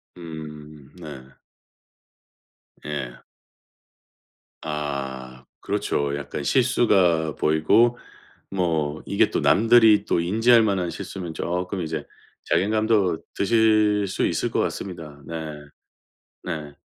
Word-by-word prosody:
음. 75 -4 -10
네. 75 -7 -10 1.6
예. 65 -5 -5 1.4
아. 65 -4 -5 0.2
그렇죠. 70 0 -1
약간 70 - -5
실수가 95 - +2
보이고 80 +11 +3 0.5
뭐 80 -5 -1
이게 - - +2
또 - - -1
남들이 110 -1 +5
또 85 - +1
인지할 115 +6 +4
만한 95 -5 0
실수면 90 -3 -7
쪼끔 90 +3 -3
이제 80 -2 -4 0.4
자괴감도 105 -4 +1
드실 105 -1 +3
수 95 - -1
있을 - - -1
것 - - 0
같습니다. 80 -6 -5
네. 80 -2 -6 0.8
네. 75 -5 -6
85 Hz, 180 characters per minute, -23 LUFS, 75-105 Hz, 1.6 s, 남들이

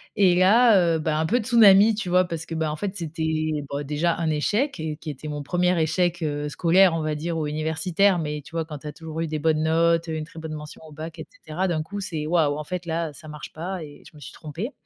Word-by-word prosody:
et 190 -4 +4
là 190 -3 +5
heu, - - -1
bah, 155 0 -1
un 160 - +1
peu 240 +9 +2
tsunami, 215 -2 +6
tu 210 -4 -4
vois? 180 +1 +4
Parce 165 -2 -5
que 165 - -6
bah, 160 -1 -1
en - - -3
fait 200 +2 -4
c'était, 160 -2 -2 0.2
bah, 140 +1 -3
déjà 150 +4 0
un 165 -2 -1
échec 205 - 0
et 155 -1 -3
qui 160 0 -8
était 150 +2 -7
mon 145 -1 -4
1er 180 +3 +1
échec, 175 +2 0
heu, 145 -1 -2
scolaire, 180 +2 +4
on 160 - -1
va 155 -1 -1
dire, 165 +2 -3
ou 155 - -1
universitaire. 160 +5 +1
Mais 150 -2 -3
tu - - -13
vois, 165 -1 -1
quand 150 -2 -7
tu 150 - -9
as 150 - -6
toujours 160 -1 -7
eu 165 - -1
des 155 0 -3
bonnes 155 0 +1
notes, 165 +1 +2
heu, - - -2
une 155 - -3
très 160 0 -12
bonne 160 -1 -6
mention 150 0 -9
au - - -14
bac 160 +2 -8
et 160 - -6 0.2
cetera, 175 +5 -1
d'un 160 -3 0
coup 205 +5 -6
c'est: 160 -6 -4
«Waouh 155 -4 +2
en 150 - -4
fait 180 +3 -5
là, 165 -1 -2
ça 155 +3 -13
marche 150 -2 -9
pas 175 +1 -5
et 145 -1 -12
je 155 - -24
me 150 - -14
suis - - -9
trompée». 170 - -6
160 Hz, 270 wpm, -24 LUFS, 155-180 Hz, 0.2 s, tsunami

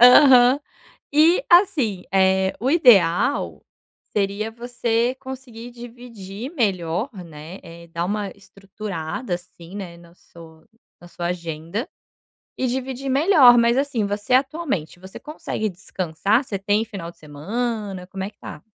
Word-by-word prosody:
Aham. 250 +1 +8 0.5
E, 330 +9 +5
assim, 280 - +3
eh, 190 0 +3
o 255 +4 +1
ideal 235 - +4 0.5
seria 205 +2 -1
você 235 +1 -1
conseguir 255 -3 -9
dividir 240 -2 -9
melhor, 195 - -1
né, 160 +3 -10
eh, 170 0 -12
dar 170 +1 -3
uma 205 +2 -2
estruturada, 195 0 -6
assim, 175 0 -11
né, 180 -4 -7
no 170 0 -18
so 160 -2 -16 0.4
na 175 - -14
sua 175 0 -5
agenda 170 - -4 0.7
e 260 - -1
dividir 265 +1 -3
melhor. 275 -4 +6
Mas, 235 +1 +3
assim, 270 -7 0
você, 205 +4 -2
atualmente, 265 - 0
você 190 +1 -11
consegue 255 -7 -4
descansar? 185 - -1
Você 200 -6 -5
tem 205 +2 +1
final 190 -6 -7
de - - -30
semana? 195 +5 -4
Como 190 0 -6
é 195 - -4
que - - -29
tá? - - -9
210 Hz, 135 wpm, -22 LUFS, 180-250 Hz, 0.7 s, Aham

